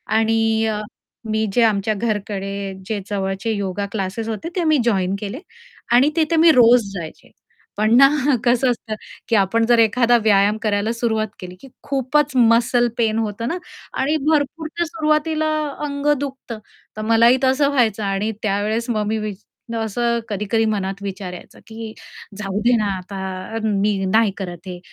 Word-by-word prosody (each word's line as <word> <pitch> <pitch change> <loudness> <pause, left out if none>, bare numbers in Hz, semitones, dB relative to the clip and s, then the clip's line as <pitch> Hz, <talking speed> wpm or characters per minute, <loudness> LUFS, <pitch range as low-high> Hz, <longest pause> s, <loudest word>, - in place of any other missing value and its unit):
आणि 225 0 +2
अ, 215 -1 -1 0.5
मी 220 0 +1
जे 240 - +4
आमच्या 215 -1 +2
घरकडे 200 -2 -3
जे 215 +1 -2
जवळचे 195 +1 -2
योगा 200 -1 -2
क्लासेस 200 +2 -3
होते, 225 +9 -4
ते 360 - 0
मी 310 -2 +3
जॉइन 195 -4 +1
केले 210 +6 -5 0.5
आणि 255 +4 +5
तिथे 330 0 +1
मी 325 +1 +7
रोज 235 -3 +5
जायचे. 165 -5 -8 0.5
पण 215 +2 +3
ना 275 +1 +9 0.4
कसं 245 +1 +3
असतं, 225 -2 -5 0.3
की 230 - +2
आपण 215 +3 +2
जर 235 0 +4
एखादा 235 +2 +4
व्यायाम 205 0 +3
करायला 210 0 0
सुरुवात 225 -2 -1
केली, 180 -1 -9
की - - -12 0.2
खूपच 275 +1 0
मसल 240 0 +4
पेन 225 -2 +1
होतं 225 +1 -3
ना 335 - -2 0.4
आणि 295 +4 +1
भरपूर 310 +1 0
तर - - +3
सुरुवातीला 310 -1 0 0.4
अंग 285 0 -3
दुखतं. 265 -5 -6 0.4
तर - - -3
मलाही 230 +3 +4
तसं 265 +2 +3
व्हायचं 225 -7 +1
आणि 200 +2 -1
त्यावेळेस 215 +3 -1
मग 215 -3 0
मी 220 +1 0
वि 210 -1 -3 0.4
असं 235 +2 0
कधी-कधी 210 +2 0
मनात 200 -2 -2
विचार 190 -2 -5
यायचा, 180 - -12
की 220 0 -8 0.4
जाऊदे 210 +4 +1
ना 215 - 0
आता 185 +2 -8 0.4
अ, - - -1
मी 205 -1 +1
नाही 220 +2 +3
करत 175 -2 -7
हे 180 -1 -6
220 Hz, 160 wpm, -20 LUFS, 200-245 Hz, 0.5 s, ना